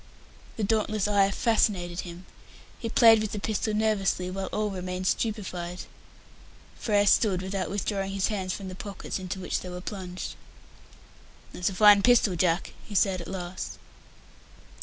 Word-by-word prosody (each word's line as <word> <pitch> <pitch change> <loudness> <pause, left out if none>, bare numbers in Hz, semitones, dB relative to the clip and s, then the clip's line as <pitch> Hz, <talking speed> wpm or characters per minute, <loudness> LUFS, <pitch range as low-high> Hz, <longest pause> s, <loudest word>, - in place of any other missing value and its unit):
The 220 - -2
dauntless 215 -1 +1
eye 200 -1 +4
fascinated 195 -5 +1
him. 175 0 -7 0.5
He 230 - -4
played 225 -1 +6
with 215 -1 -3
the 210 - -2
pistol 215 +1 -1
nervously, 200 -4 0
while 190 0 -4
all 210 -1 -2
remained 185 0 -4
stupefied. 185 -5 -2 0.9
Frere 205 -2 +2
stood, 195 -2 +3
without 190 0 -3
withdrawing 195 -1 -2
his 195 +1 0
hands 190 -4 -2
from 195 +1 -5
the 185 - -6
pockets 195 +1 -6
into 190 +1 -5
which 180 - -2
they 180 - -8
were 180 0 -6
plunged. 185 -1 -6 1.2
"That's 180 - -1
a 190 - -7
fine 205 0 +7
pistol, 230 -5 +4
Jack," 170 +1 0
he 205 - -9
said 190 -2 +2
at 170 - -8
last. 180 -1 -6
195 Hz, 155 wpm, -27 LUFS, 185-210 Hz, 1.2 s, fine